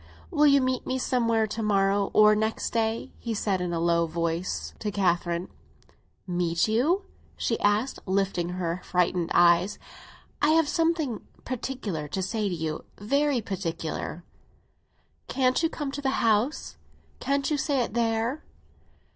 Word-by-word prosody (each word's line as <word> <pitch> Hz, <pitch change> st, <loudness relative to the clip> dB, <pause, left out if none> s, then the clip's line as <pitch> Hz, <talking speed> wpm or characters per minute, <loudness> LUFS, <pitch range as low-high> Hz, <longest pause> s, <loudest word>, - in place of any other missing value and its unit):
"Will 300 Hz, -3 st, +4 dB
you 280 Hz, -1 st, +5 dB
meet 255 Hz, -1 st, -1 dB
me 260 Hz, -, 0 dB
somewhere 230 Hz, -3 st, +1 dB
to 215 Hz, +1 st, -4 dB
morrow 200 Hz, -1 st, +2 dB
or 215 Hz, 0 st, +7 dB
next 220 Hz, +1 st, -1 dB
day?" 225 Hz, 0 st, -1 dB
he 230 Hz, -2 st, -3 dB
said, 195 Hz, -3 st, 0 dB
in 180 Hz, -1 st, -2 dB
a 170 Hz, -, -1 dB
low 170 Hz, 0 st, +2 dB
tone, 165 Hz, +1 st, -1 dB, 0.4 s
to 210 Hz, -, -2 dB
Catherine. 175 Hz, -2 st, 0 dB, 0.8 s
"Meet 175 Hz, -1 st, 0 dB
you?" 290 Hz, -, +2 dB, 0.3 s
she 230 Hz, -, -1 dB
asked, 210 Hz, +6 st, +1 dB
lifting 190 Hz, -2 st, 0 dB
her 180 Hz, -1 st, -3 dB
frightened 180 Hz, -1 st, 0 dB
eyes. 175 Hz, +3 st, +4 dB, 0.6 s
"I 310 Hz, +2 st, +4 dB
have 325 Hz, -2 st, +3 dB
something 325 Hz, -7 st, 0 dB, 0.2 s
particular 230 Hz, -, -4 dB
to 190 Hz, +6 st, -3 dB
say 210 Hz, +1 st, -1 dB
to 180 Hz, -, -2 dB
you—very 225 Hz, -, -1 dB
particular." 175 Hz, -4 st, -4 dB, 1.0 s
"Can't 255 Hz, +1 st, +2 dB
you 325 Hz, -, +2 dB
come 295 Hz, -4 st, -4 dB
to 285 Hz, -, -5 dB
the 270 Hz, -1 st, 0 dB
house? 225 Hz, +6 st, +1 dB, 0.4 s
Can't 280 Hz, +1 st, 0 dB
you 300 Hz, -, +2 dB
say 275 Hz, -2 st, +1 dB
it 230 Hz, -, -6 dB
there?" 230 Hz, +4 st, 0 dB
215 Hz, 145 wpm, -27 LUFS, 180-260 Hz, 1.0 s, or